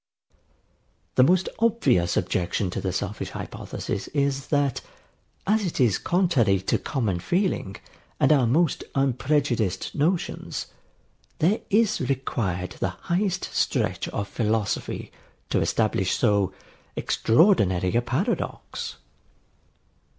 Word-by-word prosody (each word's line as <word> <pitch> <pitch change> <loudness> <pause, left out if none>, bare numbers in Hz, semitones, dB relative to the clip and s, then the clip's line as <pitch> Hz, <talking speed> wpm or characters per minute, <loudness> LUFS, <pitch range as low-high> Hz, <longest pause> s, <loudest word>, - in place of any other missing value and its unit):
] - - -42
The - - +6
most 180 +7 +4
obvious 145 - +2
objection 90 +1 0
to - - -3
the 95 - -1
selfish 100 +3 -3
hypothesis 100 - -5
is, 140 -2 -1
that, 145 -3 +1 0.6
as 215 +2 +2
it 175 -6 -3
is 120 -7 +3
contrary 150 - +2
to 95 - 0
common 105 -10 -1
feeling 175 - -1 0.4
and 135 - +4
our 130 -5 +3
most 155 +6 +2
unprejudiced 135 -5 0
notions, 165 +4 -1 0.7
there 185 +8 +2
is 215 0 +3
required 120 -9 -2
the 95 - 0 0.2
highest 185 0 0
stretch - - 0
of 100 - -3
philosophy 105 0 -2 0.4
to - - +2
establish 105 -4 +1
so 100 -5 +2 0.4
extraordinary 105 - +3
a 120 - +4
paradox. 155 - -3
130 Hz, 110 wpm, -25 LUFS, 100-170 Hz, 0.7 s, The